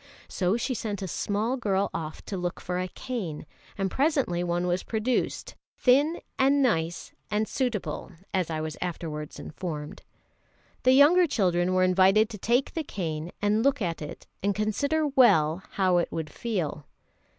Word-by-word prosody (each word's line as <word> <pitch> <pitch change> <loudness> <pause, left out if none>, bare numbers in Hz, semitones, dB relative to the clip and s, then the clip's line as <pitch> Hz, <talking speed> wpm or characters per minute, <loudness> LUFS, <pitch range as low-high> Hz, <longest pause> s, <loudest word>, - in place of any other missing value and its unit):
So 185 +3 0
she 255 +2 -1
sent 205 -4 -4
a - - -3
small 210 +8 -1
girl 200 -4 0
off 155 -2 -5
to 200 - -4
look 180 -1 -3
for 180 0 -3
a 185 - -1
cane; 185 - -5 0.3
and 195 -1 -1
presently 270 - +1
one 175 0 0
was 180 +1 0
produced, 230 +2 -1 0.2
"thin 285 +6 +3 0.2
and 275 +1 +4
nice 170 -8 0 0.2
and 210 +1 0
suitable," 215 - -2 0.2
as 185 -4 0
I 160 -1 -2
was 155 -1 -4
afterwards 160 -4 -4
informed. 150 -3 -6 0.8
The 255 - +5
younger 325 +6 +6
children 185 - +1
were 185 - +4
invited 190 +4 +4
to 210 - -7
take 240 +6 +1
the 325 - -2
cane 165 - -4
and 210 +2 +3
look 275 -1 +3
at 170 -6 -2
it, 150 - -8 0.2
and 200 0 +1
consider 280 +10 0
well 185 - +4
how 185 -2 +3
it 175 - 0
would 160 -2 -4
feel. 175 - -3
195 Hz, 160 wpm, -27 LUFS, 175-245 Hz, 0.8 s, younger